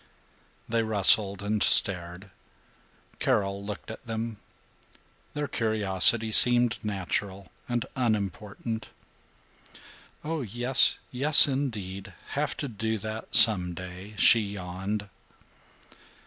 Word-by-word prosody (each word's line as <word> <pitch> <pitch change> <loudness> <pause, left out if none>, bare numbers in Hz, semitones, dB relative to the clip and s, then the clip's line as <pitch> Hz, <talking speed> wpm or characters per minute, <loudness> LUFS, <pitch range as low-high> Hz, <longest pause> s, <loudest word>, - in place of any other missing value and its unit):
They 115 0 -1
rustled 100 -2 +2
and 105 0 -2
stared. 90 +1 +3 0.9
Carol 100 0 -1
looked 105 +2 -8
at 110 - -11
them. 115 -1 -5 1.0
Their 150 -1 -3
curiosity 110 -1 +1
seemed 120 +1 +4
natural 100 -2 -5 0.2
and 120 -2 -2
unimportant. 110 -1 -4 1.3
"Oh 160 0 -4
yes, 120 +3 +1
yes 145 +4 +5
indeed, 105 -8 -5 0.2
have 150 +2 -3
to 145 - -4
do 110 -1 -4
that 110 +2 -6
some 90 -5 +5
day," 95 +4 -10
she 115 - +6
yawned. 100 0 -6
105 Hz, 95 wpm, -26 LUFS, 100-115 Hz, 1.3 s, she